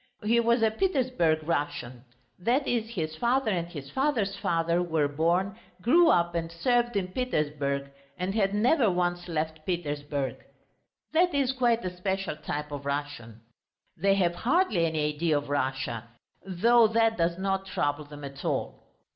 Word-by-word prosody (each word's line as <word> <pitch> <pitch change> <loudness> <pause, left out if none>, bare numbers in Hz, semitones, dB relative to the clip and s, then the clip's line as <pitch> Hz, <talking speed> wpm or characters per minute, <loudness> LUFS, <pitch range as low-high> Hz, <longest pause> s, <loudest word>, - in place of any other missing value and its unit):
He 230 +3 +3
was 235 0 +3
a 220 - +4
Petersburg 250 - +1
Russian; 145 -6 -3 0.3
that 250 +9 +1
is, 225 -2 0
his 160 -8 -3
father 245 +1 +1
and 170 -3 -1
his 145 -6 -9
father's 255 -8 0
father 170 +1 0
were 160 -4 +1
born, 175 +8 0 0.2
grew 330 - +5
up 170 - +3
and 165 -1 -2
served 240 +6 +1
in 190 -2 -1
Petersburg 145 - -2 0.3
and 185 +2 -2
had 200 -2 +1
never 235 +2 +3
once 175 -1 -1
left 160 -1 -3
Petersburg. 145 -5 -3 0.7
That 345 0 +3
is 270 -2 +2
quite 240 -5 +1
a 180 0 -4
special 190 -1 -2
type 150 0 -5
of 140 -1 -6
Russian. 140 -6 -4 0.5
They 195 +3 +2
have 175 -3 +2
hardly 230 - +2
any 150 -2 -1
idea 155 0 +1
of 145 -1 -5
Russia, 130 -5 -2 0.4
though 225 +5 +4
that 225 0 +2
does 170 -1 0
not 195 0 -1
trouble 145 -4 -1
them 145 0 -11
at 140 0 -8
all. - - -2
175 Hz, 155 wpm, -28 LUFS, 150-225 Hz, 0.7 s, grew